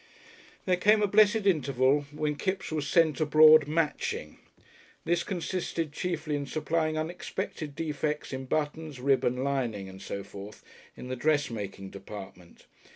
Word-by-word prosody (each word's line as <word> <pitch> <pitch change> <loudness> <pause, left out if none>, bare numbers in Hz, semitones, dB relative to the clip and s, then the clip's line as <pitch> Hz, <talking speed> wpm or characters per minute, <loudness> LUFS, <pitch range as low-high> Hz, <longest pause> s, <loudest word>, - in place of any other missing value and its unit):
There 180 -1 +2
came 210 +3 +4
a - - +3
blessed 215 +1 +4
interval 140 -5 +2
when 150 0 -2
Kipps 190 +4 -3
was 150 -2 -2
sent 160 +1 +3
abroad 155 0 +7
"matching." 150 - -2 0.7
This 175 +1 +1
consisted 170 -3 -3
chiefly 160 -2 -2
in 140 -1 -3
supplying 155 +2 -1
unexpected 155 -2 -4
defects 150 -2 -3
in 130 0 -4
buttons, 150 0 -3
ribbon, 130 -1 +1
lining, 120 -8 -2
and 95 0 -11
so 100 0 -5
forth 100 +2 -10 0.3
in - - -8
the 130 - -2
dressmaking 115 -9 -1
department. 95 -3 -11
150 Hz, 135 wpm, -28 LUFS, 130-165 Hz, 0.7 s, abroad